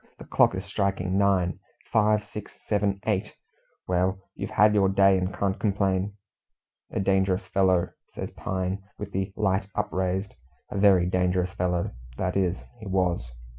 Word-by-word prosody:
The - - -11
clock - - +3
is - - -4
striking 95 -1 -1
nine; 95 -2 +2 0.3
five, 105 -1 +3
six, 105 0 -9
seven, 100 -2 +1
eight! 105 -1 -1 0.5
Well, 90 +1 +1 0.2
you've - - -5
had 105 +1 +5
your 100 -2 +4
day, 95 0 +5
and 95 0 0
can't 95 -1 -1
complain." 100 -1 +1 0.8
"A - - -2
dangerous 95 0 +2
fellow," 95 -2 +2 0.3
says - - -5
Pine, 95 +1 -3 0.2
with 105 -1 -6
the 95 +1 -2
light 95 -2 +1
upraised. 95 -1 -1 0.4
"A - - -3
very 95 -3 +5
dangerous 90 0 +1
fellow 90 -1 -1 0.3
that 90 -1 -1
is, 95 -1 +1 0.2
he 110 - -8
was. 90 -10 0
95 Hz, 150 wpm, -26 LUFS, 90-100 Hz, 0.8 s, had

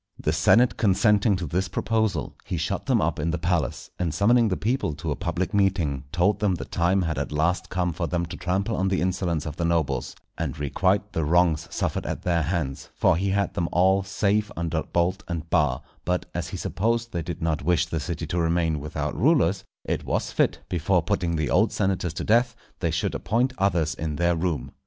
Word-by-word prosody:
The 75 - 0
senate 110 +9 +4
consenting 105 0 +3
to 90 -2 -3
this 90 +5 -1
proposal, 110 - -1
he - - -3
shut - - -2
them - - +3
up - - 0
in 80 +3 0
the 85 - 0
palace, 85 -6 -1
and 85 -3 0
summoning 115 +6 +4
the 95 - 0
people 115 - 0
to 80 +1 -4
a - - 0
public 90 +4 -2
meeting, 90 -9 +1
told 90 +4 +2
them 100 -4 +2
the - - -6
time 90 +3 +1
had 80 -2 -1
at - - -3
last 85 +4 0
come 90 -2 -1
for 85 +1 -2
them 85 0 -1
to 85 - -7
trample 100 +5 -1
on 95 0 0
the 95 -1 +1
insolence 90 -4 -1
of 75 -1 -6
the 85 - -1
nobles, 75 -6 0 0.2
and - - -3
requite 95 +8 0
the 80 - 0
wrongs 80 0 +2
suffered - - -2
at - - -4
their 85 -2 +1
hands; 75 -4 -2
for - - +3
he 95 +3 0
had 100 0 0
them 85 -1 -1
all 95 +2 +4
safe 105 +2 0
under 85 -1 -1
bolt 85 +4 0
and 85 -2 -4
bar; 75 -7 +2 0.2
but, 90 +1 -1
as - - -3
he - - -5
supposed 115 +3 -1
they 85 - -2
did 85 +2 -5
not 80 -3 -1
wish 85 +1 +2
the 80 -1 -3
city 80 +3 -4
to 85 +3 -2
remain 80 -2 +1
without 75 0 -4
rulers, 100 - +3 0.2
it - - -2
was - - -1
fit, - - +1
before 90 +1 +1
putting 85 -2 0
the 75 -5 -1
old 110 +5 +3
senators 95 -5 -1
to - - -3
death, 120 +2 +3 0.2
they 85 - 0
should 80 +1 -1
appoint 125 +4 0
others 85 -5 +1
in 80 -1 -4
their 85 +2 +2
room. 80 -5 -2
85 Hz, 210 wpm, -25 LUFS, 80-95 Hz, 0.2 s, senate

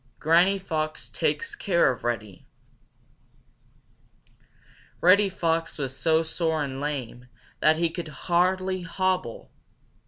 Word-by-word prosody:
Granny 175 +5 +4
Fox 155 -5 -4
Takes 460 -2 -1
Care 190 - +2
of 125 - -8
Reddy 110 -6 -4 2.5
Reddy 195 +3 +5
Fox 165 -2 -1
was 135 -3 -3
so 160 +2 +2
sore 160 -1 -1
and 135 -1 -5
lame 125 -4 -4 0.3
that 155 +1 +4
he 170 0 +1
could 165 0 -5
hardly 185 +4 0
hobble. 180 -6 -2
165 Hz, 105 wpm, -26 LUFS, 145-185 Hz, 2.5 s, Reddy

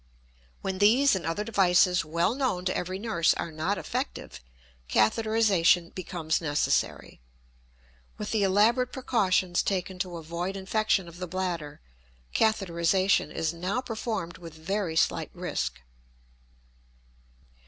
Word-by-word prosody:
When 190 -1 -3
these 235 +5 +5
and 175 -4 -3
other 165 +6 -1
devices 180 -4 +3
well 170 +6 0
known 255 -9 -1
to 185 - 0
every 185 +1 -3
nurse 195 -6 +1
are 170 - -4
not 160 +6 -1
effective, - - -5 0.5
catheterization 180 - +3
becomes 175 -3 -2
necessary. 145 - -1 1.0
With - - -5
the 220 - +1
elaborate 220 +6 +3
precautions 190 -8 +1
taken 185 -1 -2
to 180 -2 -3
avoid 170 +4 -4
infection 195 -1 0
of 170 0 -12
the 180 0 -5
bladder, 170 -5 -4 0.5
catheterization 190 -4 +2
is 160 +1 -2
now 180 +7 -2
performed 220 -8 -4
with 165 -3 -10
very 175 +1 -2
slight - - +1
risk. - - -3
185 Hz, 120 wpm, -27 LUFS, 170-210 Hz, 1.0 s, these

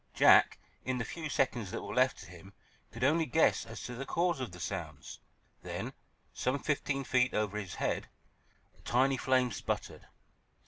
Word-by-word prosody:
Jack, - - +6 0.3
in 130 0 -1
the 115 - -2
few 160 +3 -5
seconds 120 -7 0
that - - -5
were 100 - -5
left 130 +1 +3
to - - -10
him, 90 +3 -13 0.4
could 115 +2 -6
only 155 +4 +3
guess 160 - +3
as 115 - -8
to 125 - -5
the 125 +3 -5
cause 170 +2 0
of 125 -6 -4
the 90 - -11
sounds. 85 -5 -6 0.4
Then, - - -5 0.4
some 130 +2 0
fifteen 140 -1 -1
feet 125 -1 +2
over 105 -1 0
his 95 -4 -6
head, - - -1 0.7
a - - -24
tiny 130 +2 +2
flame 130 -1 +2
sputtered. - - -4
125 Hz, 175 wpm, -32 LUFS, 105-135 Hz, 0.7 s, Jack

